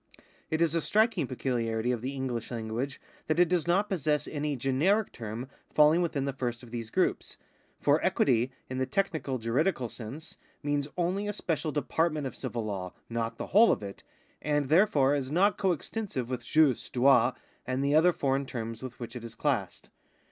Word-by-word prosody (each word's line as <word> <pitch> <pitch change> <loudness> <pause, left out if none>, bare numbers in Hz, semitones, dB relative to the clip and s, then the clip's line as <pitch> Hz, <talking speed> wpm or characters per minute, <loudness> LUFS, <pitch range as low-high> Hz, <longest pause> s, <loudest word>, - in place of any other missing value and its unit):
It 160 +1 0
is 165 -2 +3
a 165 - +1
striking 215 - +2
pecuHarity 120 -2 -1
of 120 - -3
the 135 +3 -4
Enghsh 120 -3 -3
language 120 +3 -4 0.3
that 155 - +1
it 175 0 +5
does 175 -1 0
not 195 +4 +3
possess 155 -7 0
any 150 -1 -2
generic 150 - +1
term 115 +2 -6 0.3
faUing 155 +3 +6
within 150 -5 -1
the 140 - -2
first 120 -2 -3
of 120 - -13
these 115 -2 -5
groups; - - 0 0.4
for - - +3
equity, 125 0 +2 0.2
in 130 0 -4
the 130 - 0
technical 160 -4 -1
juridical 125 +3 0
sense, 120 +7 -8 0.3
means 145 -1 0
only 185 +4 0
a 205 - -2
special 165 -5 -2
department 155 0 0
of 130 - -5
civil 120 -4 -4
law, 95 -4 -4 0.2
not 115 0 -2
the - - -4
whole 225 +4 +7
of - - -1
it, 100 -1 -8 0.4
and 145 -2 0
therefore 150 -6 +4
is 135 -3 -1
not 185 +6 +2
coextensive 180 - -2
with 125 - -3
jus, 155 -6 +3
droit, 125 -1 +4 0.3
and 130 +2 -1
the 140 - +2
other 165 +4 +6
foreign 135 -3 0
terms 115 -3 -5
with 130 -2 -8
which 120 0 -7
it 120 - -6
is 115 -1 -9
classed. 120 - -2
135 Hz, 185 wpm, -29 LUFS, 120-160 Hz, 0.4 s, whole